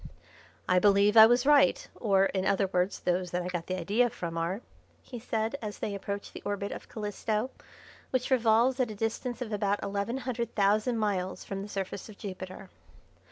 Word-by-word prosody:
"I 180 0 +4
believe 200 +2 +4
I 220 0 +11
was 245 +2 +3
right, 295 - +4
or, 195 -4 +2
in 190 -1 -1
other 195 0 +2
words, 180 +2 0
those 180 0 0
that 180 +1 -2
I 180 - -4
got 175 -2 -4
the 185 0 -2
idea 240 +6 +2
from 170 -6 -6
are," 170 +6 -2 0.4
he 245 - -8
said, 225 +1 -2
as 210 -2 -5
they 205 - -3
approached 200 +1 -5
the - - -8
orbit 200 0 -3
of - - -8
Calisto, 215 +3 -2 0.6
which 255 0 -1
revolves 240 +1 +3
at 250 -3 +1
a 215 - -6
distance 230 +4 -3
of 225 -3 -7
about 205 -1 0
eleven 200 +5 -2
hundred 240 -3 -4
thousand 215 +4 +2
miles 195 -4 -1
from 195 -1 -4
the 205 - -7
surface 195 +1 -5
of 210 - -12
Jupiter. 185 -1 -8
205 Hz, 190 wpm, -29 LUFS, 195-230 Hz, 0.6 s, I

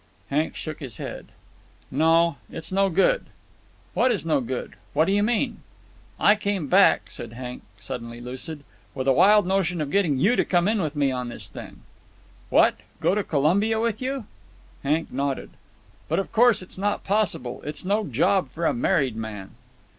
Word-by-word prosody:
Hank 150 +3 0
shook 155 -1 -6
his 130 -9 -8
head. - - -7 0.6
"No, 165 +2 +3
it's 160 - -7
no 195 +1 +3
good." 195 - +2 0.7
"What 255 +1 +3
is 205 -7 -1
no 155 -4 +2
good? 125 +1 -4 0.2
What 155 +2 +3
do 195 - 0
you 205 +1 +3
mean?" 220 +2 0 0.6
"I 205 - +6
came 200 -5 -2
back," 190 +7 +4
said 115 -1 -7
Hank, 125 +1 -7 0.2
suddenly 115 +3 -7
lucid, 130 +5 -6 0.3
"with 130 0 -3
a 135 - +5
wild 205 +8 +6
notion 180 -2 0
of 145 -2 -3
getting 170 -8 +2
you 205 - +3
to - - +3
come 175 0 +2
in 215 -1 +1
with 155 -3 -3
me 140 -2 +2
on 125 -1 -3
this - - -5
thing." - - -10 0.7
"What! - - +4 0.2
Go - - +2
to 210 0 0
Colombia 190 +10 +2
with 225 -1 -1
you?" 260 -2 -3 0.6
Hank 155 +4 0
nodded. 140 0 -2 0.6
"But, - - +1
of 195 - -2
course, 230 -3 +4
it's 185 - -8
not 205 +1 -1
possible. 190 - -1
It's 150 +3 -4
no 205 +3 +1
job 195 -2 +2
for 170 +1 -4
a - - +3
married 125 0 +1
man." 105 -3 -6
165 Hz, 175 wpm, -24 LUFS, 135-200 Hz, 0.7 s, I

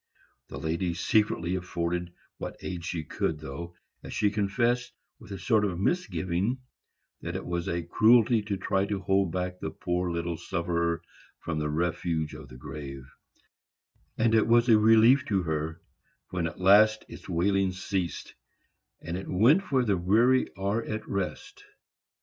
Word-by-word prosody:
The - - -8
lady 85 +2 -2
secretly 90 -1 +1
afforded 90 -1 -2 0.3
what - - -6
aid 90 -2 -5
she 85 -1 -3
could, 75 +1 -2
though, 80 +4 -7 0.3
as - - -9
she 105 -1 +2
confessed, 115 +4 0 0.3
with - - -13
a 100 - -4
sort 110 +3 +2
of 90 -4 -1
misgiving 100 - 0 0.6
that - - -5
it - - -4
was 85 -1 -3
a 85 0 -1
cruelty 110 +5 +4
to 100 -1 -3
try 95 +1 0
to 100 -1 -2
hold 95 -1 +1
back 90 0 -3
the - - -3
poor 90 +2 -2
little 85 0 -2
sufferer 85 -2 -1 0.3
from 80 -2 -4
the 75 0 -1
refuge 80 0 -1
of 75 -2 -10
the 65 - -11
grave; 70 -1 -8 1.1
and 115 0 +2
it 110 0 +4
was 120 +1 +4
a 110 -2 +7
relief 115 +5 +6
to 95 -3 0
her 80 0 -3 0.5
when 90 -2 -1
at 85 - -8
last 105 +3 +5
its - - -11
wailings 95 +1 +1
ceased, 95 -4 -3 0.7
and 85 +1 -4
it 95 - -7
went 145 - +3
where 130 -2 +3
the 100 -4 +2
weary 115 +9 +3
are 100 +4 0
at 110 -1 -5
rest. 100 -2 -4
95 Hz, 160 wpm, -28 LUFS, 85-110 Hz, 1.1 s, a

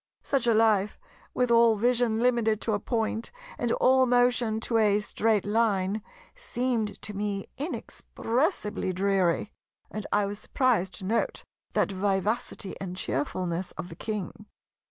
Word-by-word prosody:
Such 270 -3 0
a 230 - +4
life, 215 -2 +3 0.4
with 250 -1 +1
all 230 -1 +6
vision 240 0 +2
limited 235 -3 +2
to 220 - -1
a 205 - +1
Point, 225 0 -2 0.3
and 240 -1 0
all 260 0 +4
motion 245 -2 +2
to 230 -1 +1
a 210 -1 +4
Straight 215 0 +1
Line, 205 -2 +1 0.3
seemed 245 - -2
to 210 - -5
me 200 -1 -2
inexpressibly 255 - -2
dreary; 195 0 +1 0.4
and 215 -1 -5
I 205 -1 +3
was 200 +1 -5
surprised 225 -8 +1
to 190 - -8
note 225 +4 -1 0.3
that - - +1
vivacity 195 +1 -1
and 185 -1 -5
cheerfulness 175 +3 -2
of 165 +3 -7
the 165 - -9
King. 210 +1 -5
215 Hz, 140 wpm, -27 LUFS, 195-235 Hz, 0.4 s, all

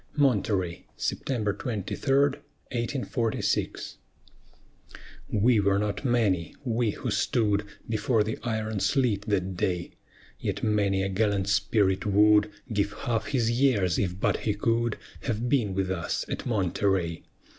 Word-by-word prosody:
MONTEREY 100 - +1
[September 110 -6 -1
23, 105 -1 -4 0.8
1846] 120 -2 -1 1.3
We 110 +2 +3
were 100 -1 +3
not 105 +3 -2
many, 110 -10 +1
we 120 -2 +1
who - - -3
stood 105 -3 +1 0.2
Before 110 0 +1
the 110 +1 -4
iron 110 -2 -2
sleet 115 -4 +1
that 95 -3 0
day: 90 -1 -1 0.5
Yet - - -3
many 100 -3 +2
a 95 - -1
gallant 100 -1 +1
spirit 100 -2 +2
would 105 +1 +5 0.2
Give 100 0 0
half 115 -2 -2
his 120 -4 +1
years 120 -9 +2
if 90 -1 -1
but - - +1
he 105 - -1
could 115 +2 0 0.3
Have 120 -1 -1
been 120 -8 +1
with 95 -1 0
us 85 -2 -2
at - - -4
Monterey. 95 -5 0
105 Hz, 125 wpm, -27 LUFS, 95-115 Hz, 1.3 s, would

